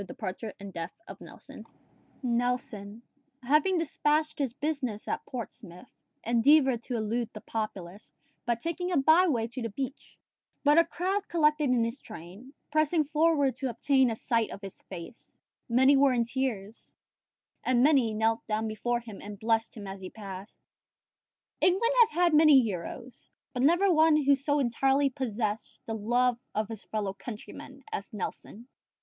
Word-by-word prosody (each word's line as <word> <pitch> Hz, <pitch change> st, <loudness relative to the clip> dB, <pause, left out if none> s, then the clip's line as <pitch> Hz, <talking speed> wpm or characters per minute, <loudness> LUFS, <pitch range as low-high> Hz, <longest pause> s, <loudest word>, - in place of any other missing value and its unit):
DEPARTURE 200 Hz, +2 st, -6 dB
AND 200 Hz, -1 st, -9 dB
DEATH 170 Hz, -, -6 dB
OF -, -, -10 dB
NELSON -, -, -11 dB, 0.6 s
Nelson, 235 Hz, -3 st, -2 dB, 0.4 s
having 305 Hz, +8 st, +3 dB
despatched 305 Hz, -1 st, 0 dB
his 275 Hz, -4 st, 0 dB
business 275 Hz, -6 st, -3 dB
at -, -, -2 dB
Portsmouth, 195 Hz, -7 st, -8 dB, 0.3 s
endeavoured 250 Hz, +2 st, +4 dB
to 245 Hz, -, -5 dB
elude 230 Hz, +1 st, -1 dB
the 215 Hz, -, -9 dB
populace 205 Hz, -3 st, -6 dB, 0.3 s
by 235 Hz, -, +1 dB
taking 335 Hz, +8 st, -3 dB
a 345 Hz, -, +2 dB
by 315 Hz, +7 st, +5 dB
way 235 Hz, -8 st, +1 dB
to 245 Hz, +2 st, -6 dB
the 230 Hz, -, -3 dB
beach, 265 Hz, +5 st, -6 dB, 0.5 s
but 295 Hz, +2 st, +6 dB
a 335 Hz, -, +5 dB
crowd 370 Hz, +5 st, -2 dB
collected 300 Hz, -3 st, +2 dB
in 245 Hz, -2 st, +3 dB
his 230 Hz, +4 st, -3 dB
train, 205 Hz, +5 st, -11 dB, 0.2 s
pressing 310 Hz, +1 st, +2 dB
forward 300 Hz, -2 st, +2 dB
to 265 Hz, 0 st, -2 dB
obtain 260 Hz, +2 st, +2 dB
a 225 Hz, -, -2 dB
sight 230 Hz, -1 st, 0 dB
of 200 Hz, -, -9 dB
his 195 Hz, -1 st, -9 dB
face: 185 Hz, +6 st, -10 dB, 0.3 s
many 265 Hz, +4 st, +5 dB
were 275 Hz, -1 st, +4 dB
in 235 Hz, -1 st, +1 dB
tears, 230 Hz, -4 st, -4 dB, 0.7 s
and 250 Hz, -1 st, +3 dB
many 270 Hz, -6 st, +4 dB
knelt 225 Hz, +1 st, 0 dB
down 220 Hz, 0 st, -1 dB
before 240 Hz, +2 st, -2 dB
him 220 Hz, -4 st, -10 dB
and 205 Hz, 0 st, -8 dB
blessed 225 Hz, 0 st, 0 dB
him 205 Hz, -, -7 dB
as 195 Hz, 0 st, -7 dB
he 185 Hz, -, -7 dB
passed. 200 Hz, -1 st, -9 dB, 1.0 s
England 410 Hz, +7 st, +3 dB
has 460 Hz, -2 st, +7 dB
had 350 Hz, -5 st, +2 dB
many 305 Hz, -2 st, +7 dB
heroes, 225 Hz, +5 st, -6 dB, 0.2 s
but 250 Hz, -, -2 dB
never 350 Hz, +8 st, +4 dB
one 315 Hz, -1 st, +5 dB
who 280 Hz, +1 st, +5 dB
so 285 Hz, +2 st, +1 dB
entirely 270 Hz, +2 st, +2 dB
possessed 225 Hz, -5 st, -3 dB
the 225 Hz, -, -4 dB
love 240 Hz, +3 st, +1 dB, 0.2 s
of 215 Hz, 0 st, -1 dB
his 225 Hz, -3 st, -8 dB
fellow 205 Hz, -3 st, -3 dB
countrymen 245 Hz, +5 st, -10 dB
as 200 Hz, -, -5 dB
Nelson. 215 Hz, +2 st, -7 dB
245 Hz, 160 wpm, -29 LUFS, 215-290 Hz, 1.0 s, has